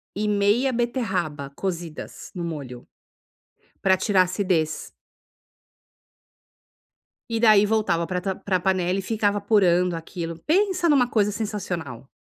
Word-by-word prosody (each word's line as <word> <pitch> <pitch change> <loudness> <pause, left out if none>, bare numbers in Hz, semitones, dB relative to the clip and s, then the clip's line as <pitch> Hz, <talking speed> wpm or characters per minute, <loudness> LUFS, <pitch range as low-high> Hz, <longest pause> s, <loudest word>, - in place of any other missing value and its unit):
e 210 +1 -1
meia 210 +6 +2
beterraba 190 - -2
cozidas 170 -4 -6
no 175 - -4
molho, 140 -7 -6 0.9
para 190 -1 +4
tirar 190 0 +3
acidez. 180 -4 -1 2.4
E, 225 - 0
daí, 215 -3 +6
voltava 205 -6 +1
para 180 -1 -2
ta 195 0 -1
para 190 -1 -1
panela 185 0 0
e 195 - -1
ficava 205 -1 0
apurando 180 -4 +3
aquilo. 165 0 -6
Pensa 370 0 +2
em 300 - +5
uma 250 -3 +4
coisa 210 -3 +1
sensacional. 175 - -5
190 Hz, 125 wpm, -24 LUFS, 170-215 Hz, 2.4 s, daí